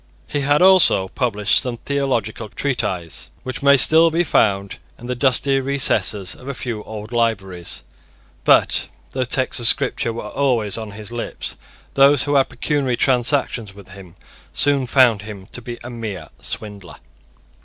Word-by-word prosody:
He 145 - -3
had 145 +4 +2
also 185 - +6
published 105 -5 0
some 125 -3 -4
theological 115 -6 -2
treatises 100 - -3
which 130 -1 -6
may 140 0 +5
still 160 +5 +6
be 165 +2 +1
found 100 - 0 0.2
in 120 - -12
the 125 - -3
dusty 135 +2 +1
recesses 130 -7 +1
of 130 - -14
a 140 - -4
few 120 -4 -5
old 110 +1 -8
libraries; 100 -7 -2 0.6
but, - - +3 0.2
though 130 -1 -2
texts 130 +1 0
of 120 - +3
Scripture 120 0 +2
were 115 - -6
always 120 -7 0
on 110 -2 -6
his 105 +1 -7
lips, 120 -1 -5 0.4
those 140 0 +5
who 145 +1 -2
had 135 -2 +3
pecuniary 140 -5 -1
transactions 125 -5 0
with 100 -2 -14
him 95 -3 -13 0.4
soon 140 -2 +1
found 120 -5 +4
him 105 -2 -10
to 125 - -6
be 120 0 -7
a 120 - -8
mere 105 -8 -7
swindler. 100 -4 -7
120 Hz, 155 wpm, -20 LUFS, 105-135 Hz, 0.6 s, also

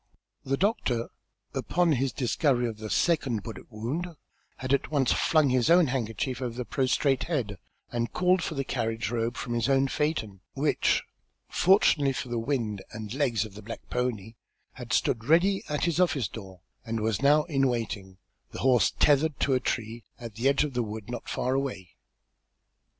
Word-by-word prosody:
The 135 +1 -1
doctor, 160 - 0 0.4
upon 175 -1 +1
his 135 -2 +1
discovery 125 -1 +1
of 110 -2 -6
the 110 0 -6
second 130 -10 +1
bullet 115 +2 -9
wound, 120 +11 -3 0.5
had 130 +1 -2
at 140 - +1
once 140 -5 +2
flung 155 -4 +3
his 125 +1 +2
own 175 0 +6
handkerchief 130 0 -2
over 120 -2 -3
the 125 - -3
prostrate 135 +1 +1
head, 115 - -2 0.3
and 120 -1 -2
called 180 0 +2
for 160 - -3
the 135 - -1
carriage 115 -2 -2
robe 120 0 -1
from 120 -2 -4
his 120 +2 0
own 135 0 +3
phaeton, 130 - -2
which, 145 +2 +2 0.5
fortunately 165 -7 +4
for 125 - -5
the 120 -1 -1
wind 115 -5 -2
and 110 -1 -6
legs 120 -6 +1
of 110 - -11
the 105 - -10
black 115 +3 -9
pony, 115 -4 -2 0.4
had - - -9
stood 115 -1 +1
ready 180 +7 +3
at 150 +1 0
his 170 0 0
office 145 - +2
door, 95 -5 -10 0.2
and 115 -1 -3
was 110 -1 -1
now 150 +2 +5
in 135 -4 +1
waiting, 105 -6 -3 0.4
the - - -5
horse 125 -6 +4
tethered 145 0 +3
to 140 - +2
a 130 - +3
tree 115 -2 -3 0.2
at 115 -2 -8
the 120 +6 +1
edge 140 +1 +3
of 150 -3 -3
the 120 - 0
wood 110 0 -6
not 120 - -6
far 130 - -1
away. 130 -11 -3
125 Hz, 180 wpm, -28 LUFS, 115-145 Hz, 0.5 s, own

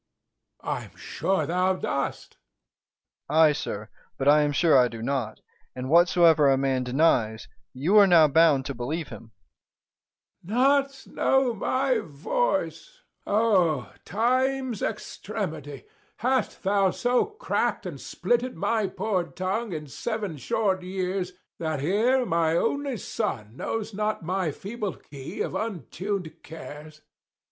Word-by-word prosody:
Æge. - - -12
I - - -9
am - - -18
sure 190 -5 -1
thou 180 +4 +1
dost. 140 -6 -3
Dro. - - -29
E. 100 - -8
Ay, 160 -2 +7
sir, 105 -6 -5 0.3
but 135 - -2
I 150 +1 +7
am 145 -1 +1
sure 160 +2 +3
I 125 -2 +6
do 115 -1 -8
not; 135 +1 -2 0.3
and 130 +2 -5
whatsoever 170 -3 +5
a 135 - +4
man 135 -1 0
denies, 125 -5 +1 0.2
you 160 +11 +2
are 200 - +7
now 165 -4 +7
bound 150 -3 +4
to 140 - -3
believe 145 +6 -4
him. 110 - -11 1.1
305 230 +9 +1 0.2
Æge. 275 -1 -16
Not - - -18
know 265 -2 +2
my 255 +3 0
voice! - - -2 0.3
O 185 - +2
time's 255 +2 0
extremity, - - -5 0.3
Hast 260 +1 -1
thou 195 0 +3
so 245 +6 +1
crack'd 425 0 -2
and - - -6
splitted 245 +1 -1
my 215 +5 0
poor 190 -2 -1
tongue 195 +6 -3
In 155 -3 -5
seven 205 - -4
short 190 - 0
years, 185 0 -3 0.3
that 160 -3 -2
here 225 - +2
my 165 -4 +1
only 275 +4 -1
son 120 - -4
Knows 225 +8 -4
not 210 -1 -2
my 180 0 -1
feeble 200 +5 -5
key 135 -2 -8
of - - -2
untuned 190 - -4
cares? 155 -1 -10
180 Hz, 140 wpm, -26 LUFS, 150-220 Hz, 1.1 s, Ay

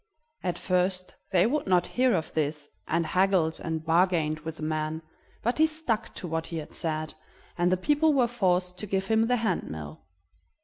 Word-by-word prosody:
At 180 -2 -2
first 185 0 0 0.2
they 180 -1 +4
would 280 +3 0
not 180 -2 +4
hear 250 0 +2
of 160 - -3
this, 150 -1 -1 0.2
and 170 0 +1
haggled 180 -2 +2
and 160 -1 -3
bargained 165 -2 +2
with 160 +1 -6
the - - -7
man, 155 +1 -2 0.4
but 240 +6 0
he 315 - +6
stuck 310 -9 -2
to 180 - -6
what 160 0 -2
he 165 - -5
had 155 - -7
said, 155 -1 -3 0.4
and 175 +1 +2
the 185 - +3
people 295 - +3
were 260 -4 +3
forced 180 -6 0
to 210 - -5
give 190 0 0
him 220 +2 +2
the 250 0 +2
hand 220 -6 -1
mill. 80 0 -7
180 Hz, 190 wpm, -28 LUFS, 160-220 Hz, 0.4 s, he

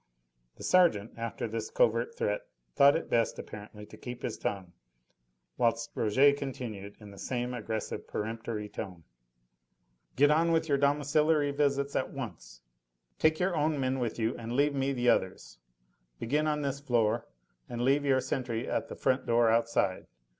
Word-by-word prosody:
The - - -11
sergeant, 165 - +3
after 115 0 -4
this 115 +1 -4
covert - - +1
threat, 480 +1 0 0.3
thought 140 -1 +6
it 165 - -2
best, 115 -1 +1
apparently, 105 0 -9
to - - -14
keep 125 0 -8
his 115 - -2
tongue, 95 -3 -4 0.9
whilst 115 -1 +1
Rouget 130 +6 +4
continued, 110 -8 -6
in 105 -2 -12
the 100 - -13
same 125 -1 -2
aggressive, 110 -2 -4
peremptory 110 -1 -4
tone: 90 -5 -7 1.1
"Get 145 +2 +5
on 165 +2 +3
with 160 -1 +2
your 140 -2 +2
domiciliary 145 +1 +2
visits 140 -1 0
at - - 0
once. - - -8 0.6
Take 155 0 +3
your 180 -1 +1
own 150 -1 +1
men 130 0 0
with 120 -3 -2
you, 115 +1 0
and 115 0 -5
leave 145 +3 +2
me 135 0 0
the 125 -2 -1
others. 95 - 0 0.6
Begin 150 - 0
on 150 -1 0
this 140 0 -2
floor, 120 -6 +1 0.4
and 120 0 -3
leave 140 +3 +3
your 135 -2 +3
sentry 125 -2 -3
at - - -1
the - - -7
front 130 +1 0
door 115 -1 +4
outside. 115 -5 +1
125 Hz, 160 wpm, -30 LUFS, 115-145 Hz, 1.1 s, thought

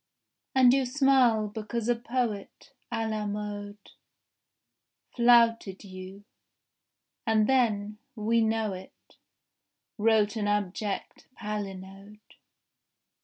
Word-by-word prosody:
And 255 -2 +6
you 270 -1 +2
smile 255 -5 +3
because 220 +2 -4
a 240 - +3
poet 235 -3 -4 0.2
À 225 0 -1
la 215 -1 -2
mode 205 0 -5 1.4
Flouted 230 -5 +4
you; 190 +1 -10 1.0
and 220 -1 +3
then, 215 -5 +1 0.2
we 230 +1 +1
know 220 -2 0
it, 185 0 -13 0.8
Wrote 215 -1 +3
an 205 -1 -1
abject 205 0 -3
palinode. 200 -1 -6
215 Hz, 90 wpm, -28 LUFS, 205-230 Hz, 1.4 s, And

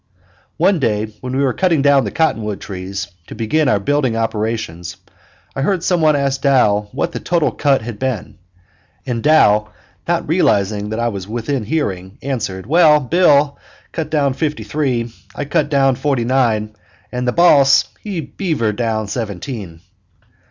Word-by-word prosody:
One 180 +2 +3
day 110 -4 -1
when 130 +1 -3
we 140 - +2
were 130 -3 +1
cutting 170 -7 +1
down 140 -2 +4
the - - -2
cottonwood 110 -10 -1
trees, 95 0 -6 0.2
to - - -9
begin 150 +7 0
our 105 - +2
building 130 +1 0
operations, 110 -6 -3 0.6
I 135 - -2
heard 180 +4 0
some 175 -2 +1
one 155 -1 +4
ask 140 -1 -1
Dow 105 -7 +2
what 170 - -2
the - - -5
total 170 -3 +1
cut 140 -5 +1
had 110 -2 -7
been, 130 -10 -4 0.7
and 120 -3 -2
Dow 105 -9 +4 0.4
not - - 0
realizing 100 +1 +1
that 110 +1 -3
I 120 0 +1
was 100 -4 -6
within 120 +3 -2
hearing, 95 - -3
answered: 110 -9 -3
"Well, 155 +2 +5
Bill 145 -1 +3 0.3
cut 160 -3 -4
down 145 -4 +1
fifty 150 +2 -2
three, 125 -6 -2 0.2
I 145 - -3
cut 145 +1 0 0.3
forty 135 -4 0
nine, 115 -4 +1 0.4
and 125 0 -3
the - - +3
boss 140 -4 +5
he 195 -6 -4
beavered 145 - -2
down 110 -3 -1
seventeen." 100 - -5
125 Hz, 160 wpm, -18 LUFS, 105-150 Hz, 0.7 s, Well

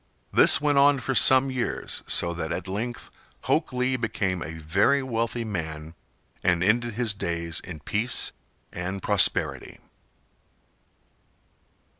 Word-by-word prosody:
This - - +7
went 145 -1 +2
on 140 0 +4
for 130 +2 -3
some 130 +1 +5
years, 125 -2 -4
so 85 0 +2
that 85 -2 -5
at - - -5
length 115 +5 -5 0.3
Hok - - 0
Lee 125 +1 -1
became 95 -6 -2
a 80 - -6
very 100 - +1
wealthy 115 -1 -2
man 80 -6 -6 0.5
and 90 -1 +1
ended 120 +3 +1
his 115 -3 +1
days 85 -4 -3
in 80 -4 -9
peace 110 - 0 0.4
and 95 +2 -5
prosperity. 100 -4 +1
105 Hz, 125 wpm, -25 LUFS, 85-125 Hz, 0.5 s, This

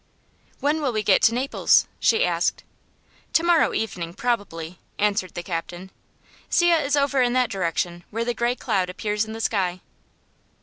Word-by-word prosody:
"When 300 +2 0
will 275 -4 0
we 215 -2 -1
get 195 -2 +4
to 225 +1 +5
Naples?" 260 +3 +3
she 455 +2 +3
asked. - - 0 0.7
"To 325 - +3
morrow 340 -2 +4
evening, 175 -6 -4
probably," 185 -8 -3 0.2
answered 205 -3 0
the 175 - -4
captain. 175 +2 -5 0.6
"See, 345 -1 +4
it 325 -3 +3
is 280 0 +1
over 280 -1 +2
in 245 -1 +2
that 255 -1 +1
direction, 175 -1 -2
where 230 +2 -3
the 240 - 0
gray 235 +2 0
cloud 195 -8 -1
appears 210 +3 -2
in 220 - -8
the 225 - -7
sky." 185 -5 0
220 Hz, 170 wpm, -23 LUFS, 185-255 Hz, 0.7 s, to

